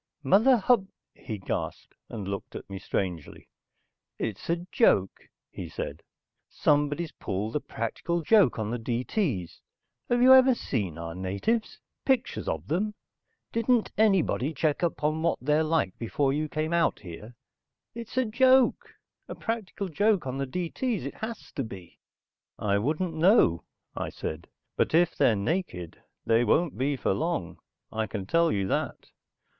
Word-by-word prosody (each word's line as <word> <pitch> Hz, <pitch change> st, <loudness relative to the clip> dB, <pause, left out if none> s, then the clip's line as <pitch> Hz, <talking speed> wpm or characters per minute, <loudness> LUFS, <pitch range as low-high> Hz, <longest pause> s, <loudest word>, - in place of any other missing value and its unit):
"Mother 220 Hz, -, +5 dB
Hub...." 215 Hz, -2 st, +3 dB, 0.3 s
he 110 Hz, -4 st, -6 dB
gasped. 95 Hz, -, -4 dB, 0.2 s
He -, -, -8 dB
looked 100 Hz, -2 st, -5 dB
at -, -, -7 dB
me 100 Hz, -1 st, -7 dB
strangely. 90 Hz, -5 st, -4 dB, 0.7 s
"It's 110 Hz, -, -4 dB
a 170 Hz, +1 st, 0 dB
joke," 95 Hz, -, +2 dB, 0.2 s
he -, -, -7 dB
said. 75 Hz, +3 st, -5 dB, 0.5 s
"Somebody's 145 Hz, +2 st, +1 dB
pulled 105 Hz, +6 st, -4 dB
a -, -, +2 dB
practical 165 Hz, +9 st, -3 dB
joke 200 Hz, -, +5 dB
on 110 Hz, -1 st, -2 dB
the 120 Hz, -, -2 dB
D.T.'s. 120 Hz, -, -2 dB, 0.5 s
Have 240 Hz, -, +3 dB
you 260 Hz, +1 st, +9 dB
ever 260 Hz, -1 st, +7 dB
seen 100 Hz, -, -3 dB
our 85 Hz, 0 st, -5 dB
natives? 100 Hz, -, -2 dB, 0.2 s
Pictures 260 Hz, -2 st, 0 dB
of -, -, -3 dB
them? 210 Hz, +7 st, -1 dB, 0.6 s
Didn't 230 Hz, 0 st, +2 dB
anybody 165 Hz, -, +2 dB
check 150 Hz, +1 st, 0 dB
up 170 Hz, -4 st, -1 dB
on 155 Hz, +1 st, +1 dB
what 170 Hz, +1 st, +1 dB
they're 150 Hz, +4 st, +2 dB
like 155 Hz, -, 0 dB
before 135 Hz, +4 st, 0 dB
you 155 Hz, +1 st, -1 dB
came 155 Hz, +2 st, -2 dB
out 170 Hz, -1 st, +2 dB
here? 105 Hz, +6 st, -10 dB, 0.6 s
It's 235 Hz, +1 st, -8 dB
a 255 Hz, -, +3 dB
joke. 255 Hz, +3 st, +3 dB, 0.3 s
A -, -, -6 dB
practical 220 Hz, -3 st, -3 dB
joke 205 Hz, +1 st, +2 dB
on 130 Hz, +1 st, -3 dB
the 135 Hz, -, -1 dB
D.T.'s. 180 Hz, -, -2 dB
It 140 Hz, -, -4 dB
has 225 Hz, +1 st, -6 dB
to 135 Hz, -, -3 dB
be." 95 Hz, -6 st, -10 dB, 0.6 s
"I 100 Hz, -1 st, +1 dB
wouldn't 160 Hz, -, -1 dB
know," 160 Hz, -, +4 dB, 0.3 s
I -, -, -3 dB
said. 80 Hz, +2 st, -6 dB, 0.3 s
"But -, -, +1 dB
if 175 Hz, 0 st, +3 dB
they're 115 Hz, -, +4 dB
naked 100 Hz, -, -3 dB, 0.2 s
they 115 Hz, +1 st, +4 dB
won't 160 Hz, +8 st, +2 dB
be 140 Hz, +2 st, 0 dB
for 120 Hz, -, 0 dB
long, 155 Hz, -, -2 dB, 0.3 s
I 110 Hz, 0 st, -2 dB
can 100 Hz, -3 st, -5 dB
tell 165 Hz, -, +3 dB
you 100 Hz, -2 st, 0 dB
that. -, -, -3 dB
150 Hz, 155 wpm, -27 LUFS, -, 0.7 s, you